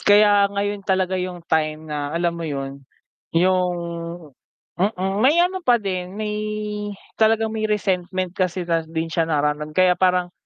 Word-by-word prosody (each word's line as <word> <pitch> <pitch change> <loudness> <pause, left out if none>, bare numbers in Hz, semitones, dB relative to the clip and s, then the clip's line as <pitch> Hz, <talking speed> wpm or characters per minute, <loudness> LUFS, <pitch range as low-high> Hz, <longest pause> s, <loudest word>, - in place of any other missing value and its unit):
Kaya 205 -1 +5
ngayon 200 0 -2
talaga 190 -1 0
'yung 180 -2 -5
time 155 -1 0
na, 150 -2 -3
alam 170 +3 0
mo 170 - -7
'yun 135 -1 -5 0.6
'yung 180 +1 +3 1.1
mm, 195 -1 0
may 270 +7 +5
ano 375 +1 -2
pa 250 -8 +4
din, 185 -3 -4
may 210 0 -2 0.9
talagang 220 0 +3
may 215 -1 -1
resentment 185 -3 -1
kasi 185 -1 -1
na 165 -1 +1
din 165 0 -3
siya 165 0 +1
nararam 150 0 -1
kaya 185 -1 +5
parang, 180 -1 +1
185 Hz, 150 wpm, -22 LUFS, 165-205 Hz, 1.1 s, Kaya